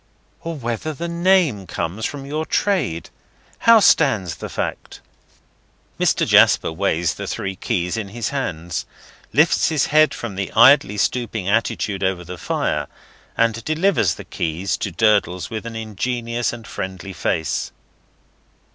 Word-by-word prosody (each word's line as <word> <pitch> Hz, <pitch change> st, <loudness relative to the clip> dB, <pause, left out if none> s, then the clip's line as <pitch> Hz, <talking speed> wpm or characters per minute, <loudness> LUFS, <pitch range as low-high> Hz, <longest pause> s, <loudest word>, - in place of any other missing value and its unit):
"Or 165 Hz, 0 st, -5 dB
whether 120 Hz, +3 st, -3 dB
the 170 Hz, +4 st, -4 dB
name 170 Hz, -, +2 dB
comes 95 Hz, +7 st, -3 dB
from 140 Hz, -2 st, -7 dB
your 150 Hz, +3 st, -3 dB
trade. 165 Hz, -, -1 dB, 0.5 s
How 230 Hz, -1 st, +7 dB
stands 110 Hz, -, +3 dB
the -, -, -7 dB
fact?" -, -, -5 dB, 1.0 s
Mr. -, -, +2 dB
Jasper -, -, +5 dB
weighs 85 Hz, -2 st, 0 dB
the -, -, -7 dB
three 95 Hz, -1 st, -3 dB
keys 90 Hz, +2 st, -2 dB
in 110 Hz, -3 st, -3 dB
his 115 Hz, +3 st, -4 dB
hand, 90 Hz, -, -3 dB, 0.5 s
lifts 155 Hz, +4 st, +3 dB
his 155 Hz, -4 st, +1 dB
head 155 Hz, 0 st, +5 dB
from 105 Hz, -5 st, -6 dB
his 95 Hz, -, -2 dB
idly 115 Hz, -3 st, +6 dB
stooping 110 Hz, -2 st, -1 dB
attitude 105 Hz, -2 st, 0 dB
over 95 Hz, -2 st, 0 dB
the 90 Hz, +1 st, -8 dB
fire, -, -, -1 dB, 0.5 s
and 115 Hz, 0 st, +1 dB
delivers 155 Hz, -, +1 dB
the -, -, -10 dB
keys 85 Hz, +4 st, -2 dB
to 100 Hz, -, -3 dB
Durdles 90 Hz, -3 st, +1 dB
with 110 Hz, +1 st, -5 dB
an 115 Hz, -, -7 dB
ingenuous 115 Hz, +2 st, -2 dB
and 115 Hz, -2 st, -9 dB
friendly 95 Hz, -3 st, -6 dB
face. 80 Hz, -3 st, -2 dB
110 Hz, 140 wpm, -21 LUFS, 95-140 Hz, 1.0 s, How